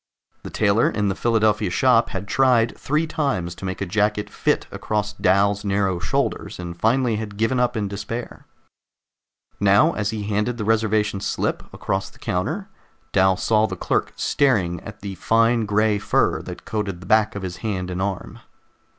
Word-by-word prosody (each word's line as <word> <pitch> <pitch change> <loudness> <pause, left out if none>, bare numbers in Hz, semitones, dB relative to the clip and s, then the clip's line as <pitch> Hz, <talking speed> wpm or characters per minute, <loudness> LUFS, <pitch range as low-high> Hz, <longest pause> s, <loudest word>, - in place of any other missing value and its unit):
The - - -8
tailor 105 +1 +2
in 105 -2 0
the 95 - -1
Philadelphia 110 -3 +2
shop 120 +4 +3
had 95 +1 -5
tried 125 -1 +3
three 150 +3 0
times 135 - -1
to 95 - -9
make 95 0 -4
a - - 0
jacket 105 +2 0
fit - - 0
across 105 -1 -2
Dal's 100 +2 +2
narrow 100 -3 0
shoulders, 100 - -2
and 85 -1 -6
finally 115 +3 +1
had 105 -2 -6
given 115 +4 +1
up 125 -1 +1
in 105 -2 -1
despair. 105 +4 -6 1.1
Now, 100 +11 +4
as 105 -2 -1
he 110 -1 -3
handed 105 +4 -1
the 105 - -3
reservation 110 -2 +1
slip - - -2
across 95 0 -3
the - - -21
counter, 125 - -2 0.4
Dal 95 -1 +3
saw 110 -1 +2
the - - -6
clerk - - -1
staring 105 - +1
at 110 -1 -10
the 100 -1 -5
fine 115 +3 +2
gray 105 0 +2
fur - - +1
that - - -9
coated 100 -5 -3
the - - -10
back 110 -1 +3
of 100 - -5
his 90 -1 -5
hand 95 -3 -3
and 90 +1 -3
arm. 95 -2 -4
105 Hz, 175 wpm, -22 LUFS, 95-115 Hz, 1.1 s, Now